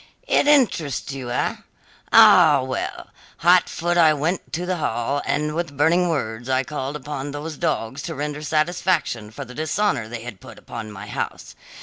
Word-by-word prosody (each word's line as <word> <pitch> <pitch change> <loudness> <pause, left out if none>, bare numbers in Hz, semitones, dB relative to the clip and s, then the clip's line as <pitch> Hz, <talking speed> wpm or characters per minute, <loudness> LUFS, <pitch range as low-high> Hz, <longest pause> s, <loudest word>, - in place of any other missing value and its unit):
"It - - +3
interests 190 - +2
you, 130 -3 -6
eh? 120 - -1 0.5
Ah, 145 -4 +7
well 130 0 -5 0.3
hot 175 +1 +4
foot 175 +1 0
I 155 -2 +6
went 160 +6 -2
to 175 +3 -2
the 180 0 -1
hall, 140 0 -1
and 150 +1 0
with 165 -4 -4
burning 170 +4 +3
words 120 -5 -3
I 130 0 +2
called 140 +1 -5
upon 145 -1 -5
those 150 +2 -6
dogs 140 -5 -2
to 165 - -5
render 150 +1 -4
satisfaction 155 - 0
for 125 +6 -8
the 125 - -11
dishonour 155 - -1
they 115 0 -7
had 115 -6 -9
put - - -12
upon 110 -2 -8
my 105 0 -9
house. 105 - -5
145 Hz, 170 wpm, -22 LUFS, 125-165 Hz, 0.5 s, Ah